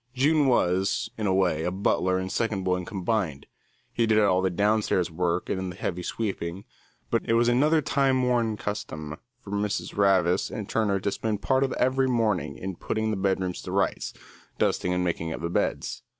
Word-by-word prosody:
June 145 +2 +3
was, 95 -1 +1
in 110 -3 -2
a - - +2
way, 90 -3 +1
butler 95 0 +1
and 95 0 -3
second 110 -5 -1
boy 90 0 0
combined; 95 -6 -2 0.5
he 115 -1 +1
did 110 -1 +3
all 100 -3 +4
the 95 - +1
downstairs 100 -2 +1
work 85 +1 -1
and 95 -1 -2
the - - -10
heavy 90 -2 -3
sweeping, 95 -2 -4 0.5
but - - +2
it - - +4
was 115 +1 +4
another 150 +6 +3
time 135 -3 +2
worn 120 -3 +1
custom 75 -8 -5 0.2
for 100 - -11
Mrs. 100 -3 -2
Ravis 95 -2 +3
and 105 -2 -5
Turner 105 -3 +1
to 100 - -1
spend 105 -1 -3
part 130 0 +2
of 135 - 0
every 130 +1 +2
morning 105 - 0
in 95 +2 -5
putting 110 0 -1
the - - 0
bedrooms 95 -2 -1
to - - -7
rights, - - 0 0.5
dusting 90 - +1
and 90 0 +1
making 80 -2 -2
up - - -6
the 85 0 -3
beds. - - -1
100 Hz, 185 wpm, -26 LUFS, 90-115 Hz, 0.5 s, all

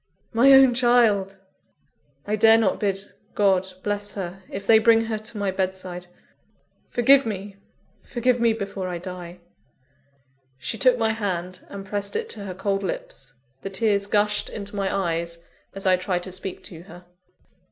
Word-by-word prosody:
My 245 +4 +6
own 265 -2 +7
child! 230 -6 +3 0.9
I 210 - 0
dare 225 +1 +6
not 220 -4 +1
bid 195 -1 -2 0.2
God 190 -2 +2
bless 205 0 -2
her, 190 -1 -6
if 195 +1 -6
they 220 +1 +6
bring 225 0 +5
her 225 -1 -3
to 215 +1 -9
my 200 -2 -1
bedside! 185 -1 -4 0.8
forgive 270 +3 +5
me! 200 -2 -6 0.4
forgive 245 0 0
me 230 -1 +3
before 200 -3 -5
I 180 -1 -3
die!" 180 0 -8 1.2
She 220 - -4
took 255 -2 +5
my 225 -1 +1
hand, 185 -4 -3
and 195 -1 -8
pressed 200 0 -3
it 450 0 -2
to 205 - -5
her 185 -2 -6
cold 195 +1 -1
lips. 135 -8 -6 0.3
The - - -5
tears 200 0 +1
gushed 210 0 +1
into 205 -1 -6
my 195 -1 -1
eyes, 170 -3 -2 0.4
as 195 - -6
I 185 -1 +4
tried 180 -1 -2
to 185 - -6
speak 185 0 -6
to 165 -2 -8
her. 175 0 -14
200 Hz, 165 wpm, -24 LUFS, 185-220 Hz, 1.2 s, own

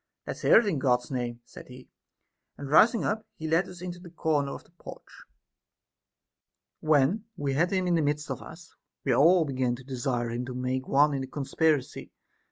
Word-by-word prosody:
Let's - - -6
hear - - +6
it 230 - +4
in 190 -9 -1
God's 125 -2 +1
name, 120 -2 -3
said - - -13
he; 125 0 -13 0.7
and 140 -1 -7
rising 230 +8 +5
up, 215 +1 -1
he 160 - -5
led 165 +4 +2
us 180 -1 -11
into 175 -1 -6
a 175 - -11
corner 150 -4 -1
of - - -8
the - - -27
porch. 175 - -13 1.5
When 155 +8 +2
we 140 -1 -2
had 165 +6 +2
him 185 -2 0
in 180 - +1
the 165 - +2
midst 150 -1 -1
of 130 - -5
us, 165 0 -13 0.3
we 135 - +1
all 165 +6 +5
began 130 -3 -1
to 130 - -13
desire 125 -2 -2
him 120 +1 -3
to 130 - -6
make 130 +1 -3
one 145 +2 +4
in 135 - -2
the 130 - -5
conspiracy. 145 +1 -1
145 Hz, 195 wpm, -27 LUFS, 130-170 Hz, 1.5 s, hear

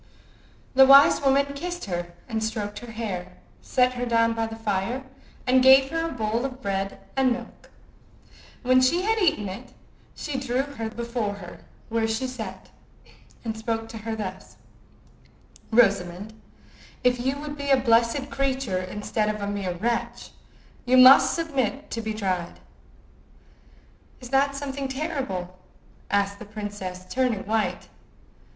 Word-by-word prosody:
The 265 0 +7
wise 275 +1 +8
woman 280 0 +2
kissed 350 +5 -5
her 175 -2 -4
and 220 -1 -2
stroked 210 -1 -3
her 240 -1 -10
hair, 185 -5 -5 0.3
set 250 0 +2
her 245 0 -3
down 230 -1 +3
by 225 0 -1
the 225 - -7
fire, 225 +3 -2 0.4
and 255 0 +4
gave 265 +1 +7
her 330 0 -1
a - - -5
bowl 225 -1 -1
of 260 -1 -4
bread 195 -2 -3 0.2
and 265 -1 +3
milk. 240 0 -6 0.9
When 255 0 +4
she 340 +8 +3
had 445 +2 +1
eaten 310 - +2
it 190 +1 -8 0.4
she 285 -3 -4
drew 260 0 0
her 250 -6 -5
before 235 -3 -3
her 175 -3 -10 0.3
where 225 0 0
she 220 +3 -1
sat, 230 -7 -7 0.7
and 220 -1 -2
spoke 225 0 -3
to 225 - -8
her 220 +1 -4
thus:— 190 -3 -7 1.1
"Rosamond, 200 -3 +2 0.7
if 245 -1 +2
you 265 +2 0
would 295 0 -6
be 280 -1 -5
a 270 - +6
blessed 240 +3 +2
creature 265 -8 -1
instead 210 +3 -2
of 210 0 -3
a 200 - -3
mere 200 -3 -3
wretch, 235 +6 -2 0.5
you 255 +1 +3
must 255 +1 +8
submit 285 -4 -2
to 230 - -3
be 220 -1 -4
tried." 185 -5 -2 1.6
"Is 250 - -10
that 275 +1 +2
something 275 -1 -4
terrible?" 265 - -4 0.5
asked 200 0 0
the - - -9
princess, 205 -3 -6
turning 245 -3 0
white. 220 +1 -1
230 Hz, 145 wpm, -25 LUFS, 205-265 Hz, 1.6 s, wise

